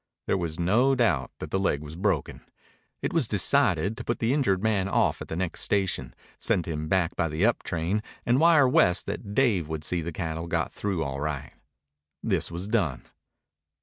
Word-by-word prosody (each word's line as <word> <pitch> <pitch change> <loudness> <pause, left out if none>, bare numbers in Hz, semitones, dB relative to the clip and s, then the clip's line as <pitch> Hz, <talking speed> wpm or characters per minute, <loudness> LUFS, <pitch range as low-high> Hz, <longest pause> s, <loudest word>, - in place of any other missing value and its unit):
There - - +1
was 85 -3 -3
no 120 +10 +3
doubt 85 - +1
that - - -7
the 95 - +1
leg 75 -6 0
was 75 +1 -9
broken. 95 -4 -1 0.6
It - - -1
was 165 -8 +2
decided 105 - +2
to 120 - -5
put 120 - -1
the 115 +3 +1
injured 100 -10 +1
man 100 -3 +1
off - - +1
at - - -6
the - - -5
next 90 -1 -2
station, 95 -11 0 0.2
send 85 - 0
him 80 -2 -4
back 90 0 +1
by 85 -1 0
the 80 +6 +1
up 120 - +2
train, 90 +5 -1 0.2
and 120 +2 +3
wire 160 -4 +6
West 125 - +3
that 100 +1 -5
Dave 110 - +2
would 80 -1 -4
see 85 +2 -1
the 85 +2 -4
cattle 80 0 -4
got - - -1
through 95 -5 -2
all 70 -1 -4
right. 70 -2 -4 0.7
This - - 0
was 85 +3 -5
done. 95 - 0
95 Hz, 195 wpm, -27 LUFS, 80-110 Hz, 0.7 s, wire